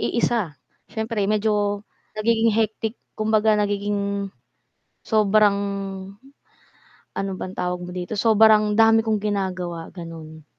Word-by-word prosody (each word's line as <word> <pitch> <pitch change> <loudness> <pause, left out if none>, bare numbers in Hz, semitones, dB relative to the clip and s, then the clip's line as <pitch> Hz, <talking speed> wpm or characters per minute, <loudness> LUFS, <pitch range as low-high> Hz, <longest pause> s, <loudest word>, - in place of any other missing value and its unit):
iisa 220 -9 0 0.3
siyempre 220 -1 -3
medyo 210 -1 0 0.3
nagiging 225 +1 +2
hectic 220 +1 -1 0.2
kumbaga 215 0 +2
nagiging, 200 -1 -1 0.7
sobrang, 210 -1 +3 1.6
ano 195 0 -2
bang 185 - -5
tawag 180 -1 -2
mo 180 - -8
dito? 180 +4 -4
Sobrang 215 -1 +5
dami 225 0 +5
kong 215 -2 +1
ginagawa, 185 -5 -3
gano'n. 160 -3 -10
210 Hz, 100 wpm, -23 LUFS, 195-220 Hz, 1.6 s, Sobrang